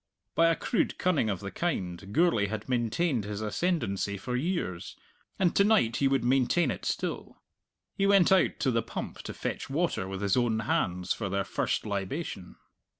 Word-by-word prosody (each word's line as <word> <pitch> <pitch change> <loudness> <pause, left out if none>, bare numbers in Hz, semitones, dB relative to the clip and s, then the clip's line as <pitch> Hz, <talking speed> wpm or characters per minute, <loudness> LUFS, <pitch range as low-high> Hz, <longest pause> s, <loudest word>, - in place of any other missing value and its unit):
By 165 0 +4
a 165 - +3
crude 230 - -1
cunning 170 - +1
of 100 -2 -2
the 100 -1 -5
kind 95 - -3
Gourlay 150 -8 +3
had 110 +1 -5
maintained 125 +2 0
his 105 0 -5
ascendancy 105 - -1
for 125 +5 -4
years, 135 - -2 0.4
and 180 -3 +2
to 200 - +5
night 200 - +3
he 140 - +3
would 135 -2 +1
maintain 135 +7 +2
it - - -6
still. - - -3 0.5
He 195 -1 +1
went 195 -2 +5
out 190 -1 +3
to 130 - +2
the 115 -1 +1
pump - - -6
to - - -6
fetch - - -4
water 150 - 0
with 95 +1 -5
his 100 -1 +2
own 120 -3 +2
hands 90 -4 0
for 105 -4 -4
their 100 +1 0
first - - -1
libation. 100 - -4
120 Hz, 180 wpm, -29 LUFS, -, 0.5 s, to